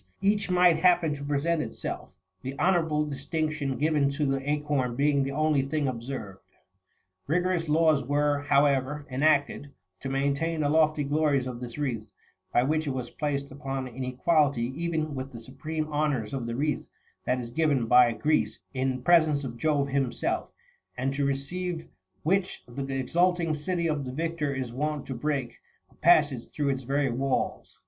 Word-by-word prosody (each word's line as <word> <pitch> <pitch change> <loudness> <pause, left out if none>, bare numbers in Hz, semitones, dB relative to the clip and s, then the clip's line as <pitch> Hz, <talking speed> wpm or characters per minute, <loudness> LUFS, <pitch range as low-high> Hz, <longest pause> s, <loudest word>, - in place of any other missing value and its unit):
each 205 0 +1
might 180 -2 +5
happen 175 -4 +3
to 140 -1 -7
present 145 +3 0
itself, - - -5 0.3
the 135 +2 -6
honourable 160 -5 +2
distinction 145 0 -2
given 150 -2 +2
to 145 +2 -1
the 135 0 -1
acorn 145 -4 0
being 140 +1 +2
the 135 0 -1
only 155 0 +2
thing 140 +1 -1
observed. 115 -5 -5 0.9
Eigorous 175 0 +1
laws 155 -2 +4
were, 145 +2 +1
however, 140 0 +2
enacted, 145 +1 +2 0.3
to 135 - -5
maintain 140 +4 0
the 145 - +1
lofty 155 -1 +3
glories 145 -2 +1
of 125 -2 -5
this 120 0 -7
wreath, 120 -7 -2 0.4
by 120 - +3
which 155 +3 0
it 135 - -1
was 125 -2 -4
placed 140 -2 -2
npon 135 -1 -4
an 130 - -4
equality 130 -1 +1
even 160 -2 -2
with 135 0 -5
the 115 - -7
supreme 155 +6 -4
honours 145 -7 0
of 130 -4 -3
the 115 - -3
wreath 150 +4 -1 0.4
that 125 0 +1
is 120 -1 -6
given 140 -3 +2
by 125 +1 +6
Greece 150 +7 0
in 130 -1 -1
presence 155 -4 +4
of 120 -3 -5
Jove33 140 0 +1
himself, 135 -3 -1 0.5
and 135 +2 -1
to 140 +1 -1
receive 165 +5 -2 0.4
which 190 +3 0
the 135 +2 -4
exulting 170 +4 +1
city 170 +3 -2
of 150 -3 -1
the 125 - -4
victor 160 0 -2
is 130 -3 -4
wont 150 +2 -2
to 135 - -5
break34 135 -2 -2 0.4
a - - -23
passage 145 -7 +3
through 145 -2 -1
its 135 -1 -1
very 135 +1 0
walls. 135 +2 -2
145 Hz, 165 wpm, -27 LUFS, 135-155 Hz, 0.9 s, by